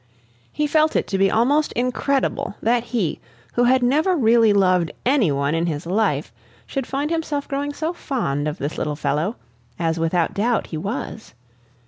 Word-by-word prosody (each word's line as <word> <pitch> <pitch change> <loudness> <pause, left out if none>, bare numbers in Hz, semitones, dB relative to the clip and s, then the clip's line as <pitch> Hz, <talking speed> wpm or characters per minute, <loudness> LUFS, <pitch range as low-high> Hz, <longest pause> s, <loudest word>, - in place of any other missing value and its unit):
He 300 - -1
felt 310 +1 +2
it - - +2
to 195 - 0
be 195 0 +4
almost 280 +9 +2
incredible 255 -2 -1
that 235 +1 +1
he 210 -10 -1 0.3
who 245 - +3
had 255 +1 +4
never 310 +9 +3
really 230 -5 +4
loved 185 -4 +3 0.2
any 250 - +3
one 140 +1 0
in 165 +1 0
his 155 -1 -3
life, 175 - 0 0.3
should 270 -3 -4
find 285 +3 -2
himself 310 -3 -2
growing 285 +1 -2
so 315 +4 -3
fond 155 - -2
of 150 +2 -3
this 145 +3 -4
little 150 -1 -2
fellow, 160 +8 -1 0.4
as 165 -1 -1
without 165 +1 +1
doubt 230 +3 +1
he 160 - -6
was. 215 - -5
225 Hz, 170 wpm, -22 LUFS, 165-275 Hz, 0.4 s, be